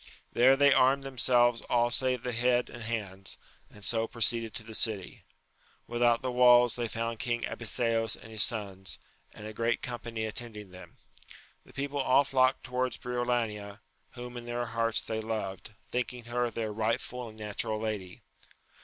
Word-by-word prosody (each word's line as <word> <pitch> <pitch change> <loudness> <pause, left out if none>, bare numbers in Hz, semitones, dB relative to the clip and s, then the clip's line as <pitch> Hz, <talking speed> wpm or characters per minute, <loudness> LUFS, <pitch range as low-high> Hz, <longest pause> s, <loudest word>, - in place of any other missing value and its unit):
There 130 +3 +6
they 140 0 +6
armed 135 +1 +4
themselves 120 -3 +3
all 120 0 +3
save 130 -1 +1
the 125 - -2
head 120 +1 +2
and 120 - -9
hands, 100 -4 -4 0.3
and 105 - -11
so 115 -1 0
proceeded 115 -1 0
to 110 - -4
the 110 0 -10
city. 110 -5 -2 0.6
Without 120 0 +2
the 130 - -1
walls 125 -1 +6
they 120 -1 -2
found 115 0 -3
King 120 -1 -1
Abiseos 115 -1 +1
and 110 - -13
his 110 -1 +3
sons, 100 -4 0 0.3
and 105 - -11
a 110 - -6
great 115 +1 0
com 120 -1 -4
pany 115 -2 -4
attending 105 -3 -5
them: 90 0 -13 0.7
the - - -18
people 140 +2 -3
all 130 +2 +5
flocked 130 -1 +2
towards 125 0 -2
Briolania, 120 -4 -2 0.3
whom 125 0 -8
in 120 - -7
their 120 0 -2
hearts 115 -1 0
they 110 0 -3
loved, 110 -2 -4 0.2
thinking 125 0 -2
her 120 +1 -1
their 110 -2 -3
rightful 115 +2 -2
and 110 - -14
natural 105 0 -2
lady. 105 -5 -4
120 Hz, 165 wpm, -30 LUFS, 110-125 Hz, 0.7 s, There